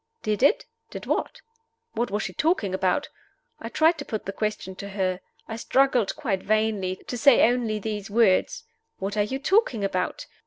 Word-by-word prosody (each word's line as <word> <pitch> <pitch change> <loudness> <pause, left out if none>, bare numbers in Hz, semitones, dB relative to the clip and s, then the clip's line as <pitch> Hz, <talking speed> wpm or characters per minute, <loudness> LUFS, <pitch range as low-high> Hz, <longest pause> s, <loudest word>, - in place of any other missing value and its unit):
Did 215 +1 -1
it? 285 +10 +4 0.2
Did - - -8
what? - - -2 0.5
What 240 - -1
was 210 +2 -2
she - - -5
talking 305 - 0
about? 190 +9 0 0.5
I 230 - -6
tried 320 +5 +3
to - - -4
put 215 - -4
the 195 - -4
question 210 -2 -3
to 200 - -7
her. 185 -2 -1 0.3
I 225 - -5
struggled 250 -3 +2
quite 215 -11 -2
vainly 215 -3 0
to 245 - -4
say 275 +2 +6
only 235 -3 0
these 210 0 -4
words: 225 - +2 0.3
"What 195 +2 -4
are 210 - +2
you 210 +6 -1
talking 285 - +2
about?" 185 -2 -2
215 Hz, 180 wpm, -25 LUFS, 195-250 Hz, 0.5 s, say